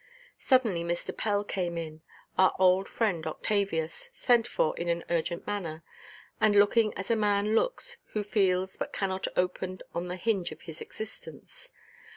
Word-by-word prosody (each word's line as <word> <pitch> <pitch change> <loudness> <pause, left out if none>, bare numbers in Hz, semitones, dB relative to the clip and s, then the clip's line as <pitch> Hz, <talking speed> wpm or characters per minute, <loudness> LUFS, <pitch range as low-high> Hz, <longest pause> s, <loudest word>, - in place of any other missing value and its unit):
Suddenly 230 -10 +3
Mr. 170 0 -3
Pell 205 -1 0
came 175 -4 -2
in, 160 -1 -6 0.3
our 190 0 +4
old 185 +1 +4
friend 180 -9 0
Octavius, 195 - -1
sent 240 - +3
for 155 - +1
in 170 0 -3
an 170 0 0
urgent 170 0 -1
manner, 170 -6 -4 0.6
and 215 -2 +4
looking 210 +2 +5
as 190 +4 -3
a - - +4
man 210 0 +2
looks - - 0 0.2
who 210 - 0
feels 190 -2 +1
but - - -4
cannot 190 -1 -1
open 180 0 -1
on 175 +1 -2
the 180 - -3
hinge 190 -1 0
of - - -10
his 160 -3 -9
existence. 220 - -9
190 Hz, 160 wpm, -29 LUFS, 170-215 Hz, 0.6 s, looking